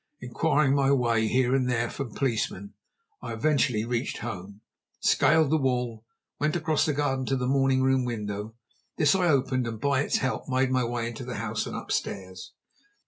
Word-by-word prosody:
Inquiring 135 +3 +1
my 140 -1 +3
way 115 -4 +2
here 125 +2 +2
and 130 -2 +1
there 120 -1 +1
from 120 -2 -6
policemen, 105 -6 -2 0.5
I - - -5
eventually 125 -3 +1
reached 120 +1 -2
home, 100 -2 -7 0.4
scaled 155 -2 +3
the 160 - +4
wall, 125 -4 -1 0.3
and 150 - 0
went 155 - -1
across 160 -3 +1
the 150 - +1
garden 135 -3 -1
to 135 - +1
the 125 - -2
morning 135 0 +2
room 130 -1 +3
window. 105 -2 -4 0.4
This 150 +1 +4
I 185 -2 +2
opened, 130 -4 +1
and 115 -2 -5
by 140 +1 +1
its - - +1
help 130 +2 -2
made 130 0 +1
my 130 -1 +2
way 120 0 -2
into 115 -1 -6
the - - -5
house - - -3
and - - -6
upstairs. 95 -1 -4
130 Hz, 185 wpm, -27 LUFS, 115-140 Hz, 0.5 s, the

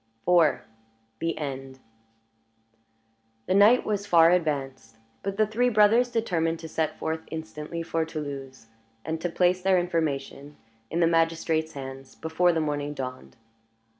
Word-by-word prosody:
IV. 170 -4 +4 0.6
THE 165 0 -2
END 135 -3 -6 1.7
The - - 0
night 210 +6 +6
was 205 -1 -2
far 170 -3 +6
advanced; 135 -9 -2 0.2
but 195 0 -4
the 215 - +4
three 235 +4 +1
brothers 225 +3 +4
determined 170 -8 0
to 165 - -7
set 155 -1 -2
forth 160 0 -3
instantly 160 +1 -6
for 165 -1 -1
Toulouse, 140 -6 -7 0.4
and 160 0 -3
to 175 - -1
place 180 +2 +2
their 190 0 +3
information 150 -4 -2 0.3
in 170 +3 -1
the - - +5
magistrate's 165 -1 +1
hands 135 -1 -9
before 160 +2 +1
the 165 - 0
morning 145 -1 -2
dawned. 130 - -7
160 Hz, 135 wpm, -26 LUFS, 145-180 Hz, 1.7 s, night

